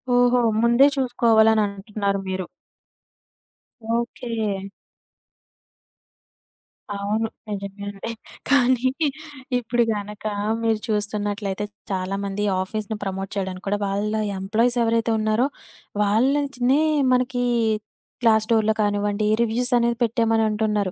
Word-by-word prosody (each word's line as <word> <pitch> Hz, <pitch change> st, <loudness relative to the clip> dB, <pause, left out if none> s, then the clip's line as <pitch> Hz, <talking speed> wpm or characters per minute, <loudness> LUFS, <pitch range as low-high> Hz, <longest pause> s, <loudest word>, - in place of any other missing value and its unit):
ఓహో! 245 Hz, 0 st, +4 dB, 0.2 s
ముందే 235 Hz, +3 st, +5 dB
చూసుకోవాలని 225 Hz, -4 st, +4 dB
అంటున్నారు 200 Hz, 0 st, -3 dB
మీరు? 190 Hz, -1 st, -2 dB, 1.5 s
ఓకే. 225 Hz, -4 st, -3 dB, 2.3 s
అవును. 210 Hz, +3 st, -1 dB, 0.2 s
నిజమే 200 Hz, 0 st, -5 dB
అండి. 200 Hz, +3 st, -6 dB, 0.4 s
కానీ, 255 Hz, -2 st, +4 dB, 0.7 s
ఇప్పుడు 240 Hz, 0 st, +1 dB
గనక 210 Hz, 0 st, -6 dB, 0.4 s
మీరు 225 Hz, -1 st, +2 dB
చూస్తున్నట్లయితే, 205 Hz, -1 st, -2 dB, 0.3 s
చాలామంది 195 Hz, +2 st, -2 dB, 0.2 s
ఆఫీస్‌ని 215 Hz, +2 st, -4 dB
ప్రమోట్ 195 Hz, 0 st, -4 dB
చేయడానికి 190 Hz, -1 st, -4 dB
కూడా, 205 Hz, +1 st, 0 dB
వాళ్ళ 205 Hz, +2 st, -1 dB, 0.3 s
ఎంప్లాయీసేవరైతే 230 Hz, +3 st, +1 dB
ఉన్నారో, 215 Hz, +4 st, +2 dB, 0.6 s
వాళ్ళనుంచినే 265 Hz, +5 st, +2 dB, 0.3 s
మనకి 250 Hz, 0 st, +1 dB, 0.8 s
క్లాస్ 220 Hz, -1 st, +4 dB
డోర్‌లో 220 Hz, -1 st, +3 dB
కానివ్వండి. 205 Hz, 0 st, 0 dB, 0.2 s
రివ్యూసనేవి 235 Hz, 0 st, +1 dB
పెట్టేయమని 225 Hz, -1 st, +2 dB
అంటున్నారు. 210 Hz, -2 st, 0 dB
215 Hz, 85 wpm, -23 LUFS, 200-235 Hz, 2.3 s, ముందే